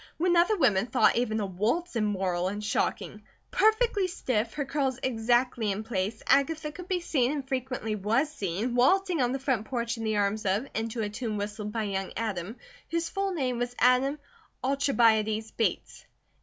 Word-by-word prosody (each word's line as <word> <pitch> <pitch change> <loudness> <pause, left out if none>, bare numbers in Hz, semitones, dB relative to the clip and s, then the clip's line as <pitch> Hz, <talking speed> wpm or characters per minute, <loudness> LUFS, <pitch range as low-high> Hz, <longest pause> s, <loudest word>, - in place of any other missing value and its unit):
When 350 +1 +2
other 355 +5 +4
women 225 - +3
thought - - +3
even 225 -2 0
a 205 - -1
waltz 225 - -1
immoral 190 -5 0
and 205 +2 -4
shocking; 210 0 -2 0.3
perfectly 435 -3 +3
stiff, 235 -10 -2
her 285 - -2
curls 270 -2 -1
exactly 240 -2 +1
in 200 +3 -3
place, 215 -1 -3
Agatha 300 +2 +2
could 360 +3 -10
be 370 -2 0
seen, 270 -7 +1
and 285 -3 -4
frequently 255 -4 -2
was 220 +9 +1
seen, 205 - -2
waltzing 345 +7 +3
on 245 -1 +2
the 270 - -1
front 260 -5 -1
porch 235 -2 -2
in 225 - -5
the 215 -1 0
arms 205 +1 0
of, 200 +6 0
and 225 +1 -2
to 225 0 -3
a 205 - -2
tune 215 0 -4
whistled 210 +1 -4
by 225 0 -2
young 195 -2 -3
Adam, 210 -2 -3 0.3
whose 335 0 -1
full 390 0 -1
name 255 -6 -1
was 245 0 -3
Adam 255 +4 +3 0.5
Alcibiades 225 -5 +2
Bates. 225 - -2
240 Hz, 180 wpm, -28 LUFS, 215-275 Hz, 0.5 s, other